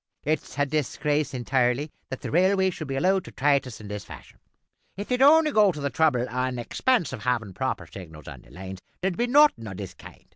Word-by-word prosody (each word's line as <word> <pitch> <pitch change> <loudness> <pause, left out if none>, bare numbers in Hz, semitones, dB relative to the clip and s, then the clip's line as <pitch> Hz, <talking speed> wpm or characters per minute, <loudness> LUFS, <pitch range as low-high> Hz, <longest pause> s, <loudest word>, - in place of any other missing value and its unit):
"It's 155 -1 -2
a 145 - +2
disgrace 150 0 -1
intirely 130 +2 0 0.2
that 130 - -6
the - - -5
railways 190 +2 +3
should 155 - -7
be 135 - -3
allowed 185 +6 +2
to - - -10
trait 140 -1 +2
us 120 - -9
in 105 - -10
this 105 -1 -5
fashion. - - -13 0.6
If 205 - -6
they'd 250 0 0
only 305 +2 +6
go 210 -6 +5
to 150 - -8
the 140 -1 -2
trouble 130 -6 +2
an' 125 +1 -2
expense 175 - 0
of 125 - -6
havin' 115 -5 -1
proper - - -3
signals 80 -6 -11
on - - -10
lines, 95 +1 -8 0.2
there 190 - +1
would 175 - -8
be 240 - +2
nothing 285 - +4
o' 95 - -7
this 95 -2 -7
kind. - - -15
140 Hz, 220 wpm, -25 LUFS, 120-185 Hz, 0.6 s, only